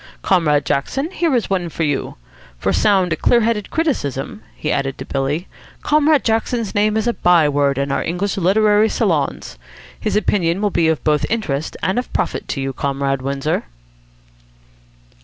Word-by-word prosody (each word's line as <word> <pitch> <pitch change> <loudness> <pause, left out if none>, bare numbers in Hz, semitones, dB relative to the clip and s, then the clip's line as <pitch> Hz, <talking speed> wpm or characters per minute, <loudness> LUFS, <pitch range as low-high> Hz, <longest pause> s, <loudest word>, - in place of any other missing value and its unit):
Comrade 155 -6 +2
Jackson, 270 - -1
here 335 -7 0
is 235 - 0
one 180 -3 -1
for 165 - -3
you. 145 -3 -2 0.4
For - - 0
sound, 190 -5 +2
clear 240 -1 +4
headed 215 -2 -1
criticism," 215 - -2
he 155 - -3
added 135 -1 -1
to - - -7
Billy, 145 +6 -2 0.4
"Comrade 300 -1 +3
Jackson's 225 -1 -1
name 210 +1 +2
is 220 - 0
a 240 - +1
by 175 -6 +4
word 140 -1 +1
in 140 0 -1
our - - 0
English 185 +5 -2
literary 210 +3 +3
salons. - - -1 0.4
His 215 - -2
opinion 190 -4 +1
will 205 -1 0
be 160 -2 +2
both 150 -1 0
of - - -7
interest 160 -10 -2
and 190 +6 +1
of 250 - -6
profit - - -2
to 135 - -3
you, 135 0 -3
Comrade 135 0 -1
Windsor." 140 - -2
180 Hz, 165 wpm, -19 LUFS, 145-220 Hz, 0.4 s, clear